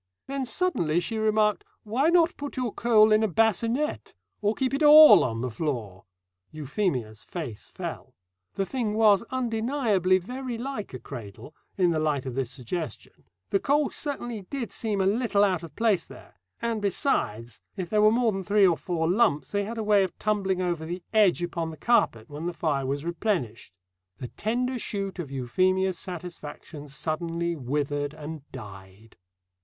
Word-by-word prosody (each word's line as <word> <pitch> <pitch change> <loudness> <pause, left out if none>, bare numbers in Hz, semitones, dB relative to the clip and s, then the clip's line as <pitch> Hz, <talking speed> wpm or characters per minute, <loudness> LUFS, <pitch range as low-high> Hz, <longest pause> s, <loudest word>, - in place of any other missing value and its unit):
Then 275 -1 -3
suddenly 220 - +1
she 220 +6 -3
remarked, 215 -1 +2 0.2
"Why 250 +9 +1
not 340 0 +4
put 285 -1 -7
your 250 -3 -1
coal 220 -2 +4
in 215 0 +5
a 220 - +2
bassinette? 225 - 0 0.3
Or 210 +1 +1
keep 265 0 -1
it 275 - -1
all 305 +1 +9
on 115 -2 -2
the 125 -1 -3
floor?" 110 - -4 0.5
Euphemia's 140 - -2
face 145 - -7
fell. - - -7 0.4
The 195 - 0
thing 225 -2 -2
was 215 -3 +5
undeniably 225 -6 +1
very 250 +5 -5
like 230 - -5
a - - -6
cradle, 115 +2 -9 0.2
in 180 -3 +3
the 160 - 0
light 150 -4 0
of 130 - -4
this 130 -1 -2
suggestion; 140 +6 -6 0.3
the 195 - +3
coal 285 +3 +1
certainly 240 -7 -4
did 270 -4 -4
seem 210 -4 -1
a - - +2
little 210 0 +2
out 185 -4 +2
of 165 - -11
place 215 -7 +2
there; - - -14 0.3
and 230 -2 -2
besides, 120 - -1 0.2
if 180 -3 -5
there 210 -1 +3
were 215 - +7
more 235 0 +2
than 195 -1 -3
three 205 +1 +4
or 170 -3 +3
four 165 -3 -2
lumps 175 - +2
they 205 0 0
had 230 +3 -6
a 220 - -2
way 210 -1 +4
of 185 - -5
tumbling 195 -3 0
over 170 -3 -1
the 175 +2 -5
edge 200 -5 +4
upon 170 -1 -3
the 160 - -9
carpet 120 - +1
when 150 +3 -6
the 175 - -3
fire 145 -5 -1
was 140 +3 -2
replenished. 170 - -2 0.5
The 125 - -7
tender 250 +3 -2
shoot 195 -3 -4
of 160 -6 -4
Euphemia's 185 +8 0
satisfaction 165 -4 -8
suddenly 165 +4 -2
withered 145 +1 -2
and 155 0 -7
died. 100 -2 -12
185 Hz, 170 wpm, -26 LUFS, 150-225 Hz, 0.5 s, all